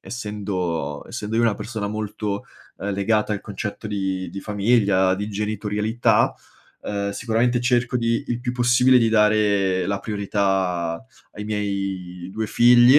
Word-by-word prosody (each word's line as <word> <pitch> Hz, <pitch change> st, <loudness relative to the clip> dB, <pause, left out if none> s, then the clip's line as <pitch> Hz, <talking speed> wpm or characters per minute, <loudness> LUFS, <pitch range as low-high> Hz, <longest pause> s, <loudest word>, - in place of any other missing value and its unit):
essendo 100 Hz, -7 st, -3 dB
essendo 105 Hz, +1 st, -5 dB
io 115 Hz, -, +3 dB
una 115 Hz, -3 st, +3 dB
persona 110 Hz, -3 st, -4 dB
molto, 105 Hz, -1 st, -3 dB, 0.3 s
uhm, 100 Hz, 0 st, -3 dB
legata 105 Hz, +2 st, +1 dB
al 100 Hz, -, -2 dB
concetto 105 Hz, +1 st, -5 dB
di 95 Hz, -3 st, -2 dB
di 100 Hz, -, -6 dB
famiglia, 100 Hz, -2 st, +2 dB
di 105 Hz, +1 st, -3 dB
genitorialità, 105 Hz, +2 st, +1 dB, 0.5 s
uhm, 100 Hz, -1 st, -2 dB
sicuramente 120 Hz, +3 st, +1 dB
cerco 125 Hz, 0 st, +1 dB
di 115 Hz, -1 st, +1 dB
il 120 Hz, -, -1 dB
più 125 Hz, 0 st, -2 dB
possibile 125 Hz, +1 st, +4 dB
di 115 Hz, -, +3 dB
dare 105 Hz, -4 st, +3 dB
la 100 Hz, 0 st, -1 dB
priorità 95 Hz, -4 st, -1 dB, 0.3 s
ai 105 Hz, -, -7 dB
miei 95 Hz, -4 st, -3 dB
2 110 Hz, +2 st, -3 dB
figli, 120 Hz, +5 st, +7 dB
105 Hz, 140 wpm, -23 LUFS, 100-115 Hz, 0.5 s, figli